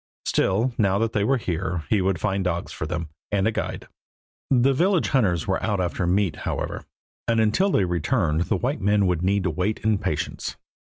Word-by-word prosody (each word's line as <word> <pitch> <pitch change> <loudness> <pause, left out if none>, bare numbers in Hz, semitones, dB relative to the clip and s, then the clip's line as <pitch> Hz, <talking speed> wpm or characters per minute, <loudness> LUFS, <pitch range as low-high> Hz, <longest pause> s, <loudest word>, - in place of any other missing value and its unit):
Still, 115 +7 +1
now 100 -2 +3
that 115 +1 0
they 100 - +1
were 135 +5 +2
here, 90 -5 -2
he 105 -3 +3
would 95 -2 0
find 100 0 0
dogs 85 -1 -2
for - - -4
them, 80 -1 -3 0.2
and 100 -1 +2
a - - +2
guide. - - -4 0.6
The 135 +1 +4
village 180 +5 +2
hunters 95 - +2
were 95 - 0
out 105 -3 0
after 90 0 -1
meat, 90 -3 +1
however, - - -4 0.4
and 115 -1 +2
until 110 - +3
they 100 - +2
returned 85 -1 0
the - - 0
white 130 -1 -2
men 100 +1 +3
would 90 -3 +1
need 100 +2 +1
to 90 - 0
wait 95 +7 -1
in 110 -2 +2
patience. - - -3
100 Hz, 195 wpm, -24 LUFS, 90-110 Hz, 0.6 s, The